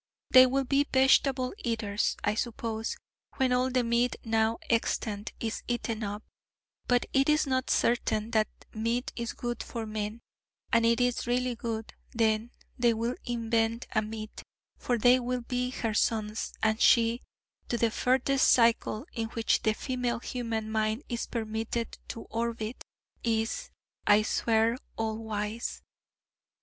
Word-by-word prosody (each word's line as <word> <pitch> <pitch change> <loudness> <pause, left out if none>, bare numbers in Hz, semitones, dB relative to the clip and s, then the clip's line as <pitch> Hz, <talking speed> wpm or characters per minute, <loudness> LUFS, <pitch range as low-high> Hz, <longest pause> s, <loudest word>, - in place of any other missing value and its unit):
They 255 0 +9
will 270 +2 +1
be 280 +2 +2
vegetable 265 -1 +4
eaters, 225 - -1
I 205 - +2
suppose, 225 0 -3 0.4
when 260 -2 +2
all 250 +1 +2
the 255 -1 +1
meat 235 +1 +1
now 225 0 +1
extant 215 -2 -1
is 225 -1 -3
eaten 230 -2 -2
up: 205 +1 -4 0.6
but 245 0 +3
it 270 +2 +3
is 300 +1 +4
not 260 -1 0
certain 230 -2 +1
that 215 -1 +3 0.3
meat 230 +3 -1
is 235 0 -3
good 240 -1 -4
for 230 -1 -5
men: 215 +1 -4 0.5
and 230 0 +5
if 230 - +5
it 235 - -1
is 245 0 0
really 250 +1 +1
good, 225 -1 -5 0.2
then 225 0 +1 0.3
they 240 -1 +4
will 230 +2 -1
invent 230 -1 0
a 215 - +2
meat: 215 0 -7 0.3
for 245 - -1
they 245 +3 +5
will 250 0 -2
be 250 +1 -2
her 230 -3 -2
sons, 215 0 0
and 220 +1 +2
she, 230 0 +5 0.5
to 240 - 0
the 230 -1 +2
furthest 265 +3 +2
cycle 230 0 +3
in 225 -2 -2
which 225 0 +1
the 220 - +2
female 250 -1 -2
human 230 -2 -3
mind 220 +4 0
is 235 -2 -3
permitted 225 0 -3
to 230 - -6
orbit, 230 0 -3 0.4
is, 225 - -1 0.4
I 210 +1 +6
swear, 225 +2 +2 0.2
all 220 0 -2
wise. 220 +1 -4
230 Hz, 150 wpm, -29 LUFS, 220-245 Hz, 0.6 s, They